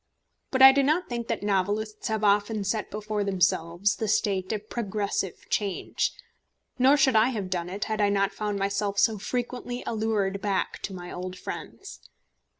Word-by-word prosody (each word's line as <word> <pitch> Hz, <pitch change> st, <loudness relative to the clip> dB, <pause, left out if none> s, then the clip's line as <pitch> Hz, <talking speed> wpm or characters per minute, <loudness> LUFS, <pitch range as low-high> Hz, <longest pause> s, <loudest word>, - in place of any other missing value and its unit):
But 260 Hz, 0 st, +3 dB
I 265 Hz, -, +12 dB
do 280 Hz, +1 st, +3 dB
not 310 Hz, +6 st, +1 dB
think 235 Hz, -1 st, -4 dB
that -, -, -2 dB
novelists 205 Hz, +2 st, -1 dB
have 220 Hz, -1 st, -1 dB
often 205 Hz, +1 st, +2 dB
set 205 Hz, +1 st, -2 dB
before 210 Hz, 0 st, -3 dB
themselves 190 Hz, 0 st, +1 dB
the 220 Hz, -, -2 dB
state 200 Hz, -3 st, 0 dB
of 215 Hz, -1 st, -4 dB
progressive 205 Hz, -5 st, -3 dB
change, 200 Hz, -3 st, -1 dB, 0.7 s
nor 270 Hz, +3 st, +6 dB
should 270 Hz, -4 st, +4 dB
I 220 Hz, +2 st, +6 dB
have 205 Hz, -7 st, -4 dB
done 175 Hz, -1 st, -2 dB
it, 195 Hz, +3 st, -4 dB
had 215 Hz, -1 st, -2 dB
I 205 Hz, -, +4 dB
not 200 Hz, 0 st, +1 dB
found 210 Hz, 0 st, -2 dB
myself 200 Hz, +1 st, -1 dB
so 220 Hz, 0 st, +3 dB
frequently 245 Hz, +2 st, -4 dB
allured 210 Hz, -3 st, -1 dB
back 200 Hz, -2 st, -1 dB
to 195 Hz, -, -7 dB
my 175 Hz, -1 st, -8 dB
old 185 Hz, +1 st, -6 dB
friends. 395 Hz, -, -8 dB
205 Hz, 170 wpm, -27 LUFS, 195-225 Hz, 0.7 s, I